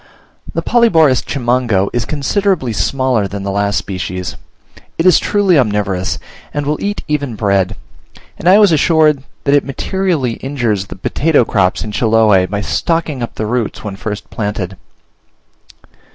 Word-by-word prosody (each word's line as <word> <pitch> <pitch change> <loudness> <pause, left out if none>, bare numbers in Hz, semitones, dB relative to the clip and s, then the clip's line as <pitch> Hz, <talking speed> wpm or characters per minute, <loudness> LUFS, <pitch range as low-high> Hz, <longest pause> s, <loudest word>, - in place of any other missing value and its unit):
The - - -1
Polyborus 165 - +4
Chimango 120 -7 0
is 120 -1 -1
considerably 155 - 0
smaller 120 +2 0
than 100 0 -6
the 100 - -2
last 100 +1 0
species. 90 -1 -4 0.6
It 165 - 0
is 180 -3 +6
truly 195 -6 +2
omnivorous, 100 -7 0 0.3
and 145 -1 -3
will 150 +1 -2
eat 205 +1 -2
even 145 -5 -2
bread; 100 -2 +1 0.6
and 175 - +2
I 195 - +7
was 205 -4 +5
assured 155 -2 +3 0.2
that 140 - +2
it 145 - +4
materially 150 - -1
injures 120 -8 -2
the - - -8
potato 140 - +1
crops 95 -4 +1
in 110 - -5
Chiloe, 110 -4 +3
by 100 +2 -3
stocking 160 +1 -1
up 120 - -5
the 110 - -3
roots 115 -1 -2
when 105 -3 -5
first 105 +1 -5
planted. 100 -3 -3
120 Hz, 150 wpm, -15 LUFS, 100-150 Hz, 0.6 s, I